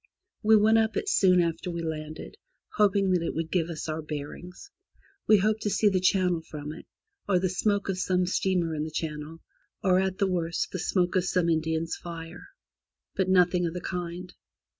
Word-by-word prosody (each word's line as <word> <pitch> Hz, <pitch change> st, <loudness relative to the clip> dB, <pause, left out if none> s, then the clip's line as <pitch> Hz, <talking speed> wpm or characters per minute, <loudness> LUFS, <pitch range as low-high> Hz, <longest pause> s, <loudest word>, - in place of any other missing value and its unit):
We 220 Hz, +1 st, +5 dB
went 220 Hz, +2 st, +5 dB
up 220 Hz, 0 st, 0 dB
it 410 Hz, -, -2 dB
soon 185 Hz, -, +4 dB
after 170 Hz, +1 st, -1 dB
we 170 Hz, -1 st, -4 dB
landed, 155 Hz, -, -6 dB, 0.4 s
hoping 200 Hz, -2 st, +3 dB
that 180 Hz, -2 st, +2 dB
it 165 Hz, -, -3 dB
would 160 Hz, 0 st, -3 dB
give 170 Hz, -2 st, 0 dB
us 165 Hz, -1 st, -5 dB
our 155 Hz, 0 st, -3 dB
bearings. 155 Hz, -, -8 dB, 0.6 s
We 215 Hz, -, +7 dB
hoped 215 Hz, +2 st, +1 dB
to 210 Hz, -, -1 dB
see 210 Hz, +1 st, +3 dB
the 190 Hz, -2 st, +1 dB
channel 180 Hz, -2 st, +2 dB
from 150 Hz, -1 st, -7 dB
it, 160 Hz, -, -12 dB, 0.4 s
or 185 Hz, -, +4 dB
the 185 Hz, +1 st, 0 dB
smoke 205 Hz, +2 st, 0 dB
of 190 Hz, -2 st, -2 dB
some 180 Hz, -1 st, +1 dB
steamer 180 Hz, -2 st, 0 dB
in 150 Hz, -1 st, -2 dB
the 155 Hz, -, -4 dB
channel, 155 Hz, 0 st, -5 dB, 0.4 s
or 185 Hz, -2 st, +4 dB
at 190 Hz, -1 st, -1 dB
the 200 Hz, -, +2 dB
worst 175 Hz, -3 st, -1 dB
the 185 Hz, -, -4 dB
smoke 180 Hz, +1 st, 0 dB
of 185 Hz, -1 st, +2 dB
some 180 Hz, -2 st, +1 dB
Indian's 160 Hz, 0 st, -1 dB
fire. 165 Hz, -1 st, -9 dB, 0.7 s
But 190 Hz, -1 st, 0 dB
nothing 180 Hz, -1 st, +3 dB
of 165 Hz, -, -6 dB
the* -, -, -2 dB
kind. 180 Hz, 0 st, -5 dB
180 Hz, 195 wpm, -27 LUFS, 165-190 Hz, 0.7 s, We